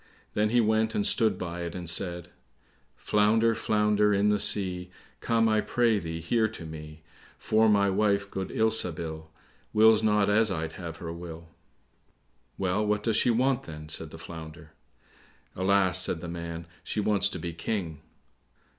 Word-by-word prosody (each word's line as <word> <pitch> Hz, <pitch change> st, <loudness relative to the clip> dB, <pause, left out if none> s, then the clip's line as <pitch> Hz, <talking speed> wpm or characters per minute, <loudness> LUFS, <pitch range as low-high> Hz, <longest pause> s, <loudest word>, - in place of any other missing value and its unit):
Then 105 Hz, +1 st, +1 dB
he 120 Hz, +2 st, +3 dB
went 110 Hz, 0 st, +1 dB
and 105 Hz, -, 0 dB
stood 110 Hz, -4 st, +3 dB
by 85 Hz, -1 st, -5 dB
it, 85 Hz, 0 st, -5 dB
and 90 Hz, -2 st, -6 dB
said, 85 Hz, 0 st, 0 dB, 0.7 s
"Flounder, 110 Hz, +2 st, +2 dB
flounder 105 Hz, -1 st, +2 dB
in 100 Hz, +1 st, +2 dB
the 105 Hz, 0 st, +2 dB
sea, 90 Hz, -3 st, 0 dB, 0.3 s
Come, 115 Hz, -1 st, +2 dB
I 110 Hz, -1 st, +2 dB
pray 115 Hz, -2 st, +1 dB
thee, 80 Hz, -2 st, -5 dB
here 110 Hz, +7 st, +1 dB
to 110 Hz, -6 st, -9 dB
me; 75 Hz, 0 st, -10 dB, 0.3 s
For 110 Hz, 0 st, +2 dB
my 100 Hz, -1 st, +4 dB
wife, 100 Hz, 0 st, +1 dB
good 95 Hz, -1 st, -4 dB
Ilsabil, 85 Hz, -8 st, -2 dB, 0.4 s
Wills 110 Hz, 0 st, +6 dB
not 105 Hz, -2 st, +2 dB
as 110 Hz, +2 st, +3 dB
I'd 80 Hz, -4 st, -3 dB
have 85 Hz, -3 st, -7 dB
her 85 Hz, -1 st, -6 dB
will" 85 Hz, -1 st, -9 dB, 1.1 s
"Well, 95 Hz, +2 st, 0 dB
what 105 Hz, 0 st, 0 dB
does 115 Hz, -2 st, +1 dB
she -, -, +3 dB
want, 125 Hz, +2 st, +1 dB
then?" 75 Hz, -1 st, -9 dB
said 80 Hz, 0 st, -3 dB
the 80 Hz, -, -10 dB
Flounder. 80 Hz, -1 st, -10 dB, 0.8 s
"Alas," 95 Hz, -1 st, +2 dB
said 90 Hz, -, -1 dB
the 85 Hz, -, -7 dB
man, 85 Hz, -1 st, -6 dB, 0.2 s
"she -, -, -3 dB
wants 100 Hz, -1 st, +2 dB
to -, -, -6 dB
be 85 Hz, -1 st, -5 dB
King." 85 Hz, -3 st, -4 dB
100 Hz, 165 wpm, -27 LUFS, 85-110 Hz, 1.1 s, Wills